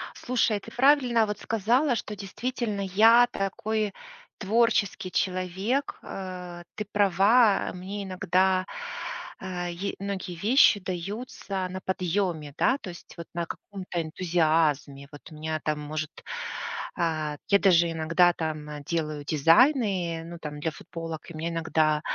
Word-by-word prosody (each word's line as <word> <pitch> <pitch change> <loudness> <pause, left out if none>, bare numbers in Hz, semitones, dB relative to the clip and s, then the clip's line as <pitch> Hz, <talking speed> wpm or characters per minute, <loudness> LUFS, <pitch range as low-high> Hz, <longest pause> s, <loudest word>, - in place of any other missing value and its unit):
Слушай, 235 -4 +1
ты - - -12
правильно 250 -4 +4
вот 210 -1 -4
сказала, 240 +6 +2
что 210 -1 -4
действительно 210 +1 -3
я 225 +5 +6
такой 210 +1 -2 0.4
творческий 210 -3 +1
человек. 190 +8 -1
Э, 180 -2 -7
ты 210 - -4
права. 205 +2 +4
Мне 195 +3 -5
иногда, 185 0 +1 0.7
а, 180 -2 -4
е 175 +3 -4
многие 195 -2 -4
вещи 210 - +5
даются 190 +1 -4
на 185 +1 -6
подъеме, 180 -5 -1
да? 265 - +3
То - - -8
есть 175 - -11
вот 170 - -7
на 170 0 -2
каком-то 185 -1 -5
энтузиазме. 155 -4 +1
Вот 145 - -11
у - - -10
меня 155 +1 -3
там, 150 -1 -1
может, 155 +1 -5 0.7
а, 155 -3 -1
я 200 - +6
даже 175 -4 +5
иногда 165 +2 +3
там, 155 -2 -4
э, 150 -1 -7
делаю 155 -3 -2
дизайны, 170 - +3
ну, 170 +1 -8
там 150 -1 -6
для 160 - -1
футболок, 165 +1 -8
и - - -9
у - - -7
меня 165 +2 -2
иногда 160 -2 +1
185 Hz, 140 wpm, -27 LUFS, 165-205 Hz, 0.7 s, я